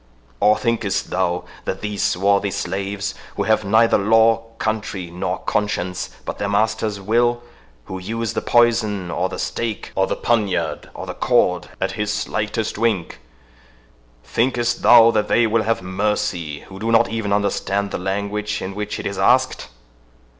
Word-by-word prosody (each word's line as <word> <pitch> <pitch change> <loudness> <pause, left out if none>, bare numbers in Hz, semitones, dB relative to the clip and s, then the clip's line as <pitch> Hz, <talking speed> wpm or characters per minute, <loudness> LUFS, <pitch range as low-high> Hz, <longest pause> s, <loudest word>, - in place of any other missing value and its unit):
—or 105 +1 +4
thinkest 110 -5 -1
thou 90 -1 0 0.2
that 95 - -3
these 105 -1 -3
swarthy 100 +2 +2
slaves, 100 +1 -3 0.2
who - - 0
have 110 -1 +2
neither 110 +3 +4
law, 115 +2 +4
country, 105 -6 -3
nor 90 - -2
conscience, 90 -3 -2 0.2
but - - -5
their 100 - -1
master's 105 0 0
will—who 115 - -2
use 115 +3 -3
the - - -1
poison, 110 -6 +2
or - - -1
the - - -6
stake, 115 -3 -3
or 95 0 +1
the - - -1
poniard, 100 -8 -1
or - - -6
the - - -5
cord, - - +1
at - - -1
his 105 0 -2
slightest 105 +1 -2
wink—thinkest - - -3
thou 115 -1 +8
that 105 -2 0
THEY 120 - +3
will 110 0 +2
have 115 -3 -1
mercy, 95 -5 -2
who 95 0 -12
do 115 +2 -1
not 115 - +5
even 110 -3 -2
understand 100 0 0
the - - -3
language 100 +3 -2
in 95 - -5
which 105 +1 -4
it - - -6
is 100 -1 -3
asked? 130 +6 +2
100 Hz, 155 wpm, -21 LUFS, 95-110 Hz, 0.2 s, thou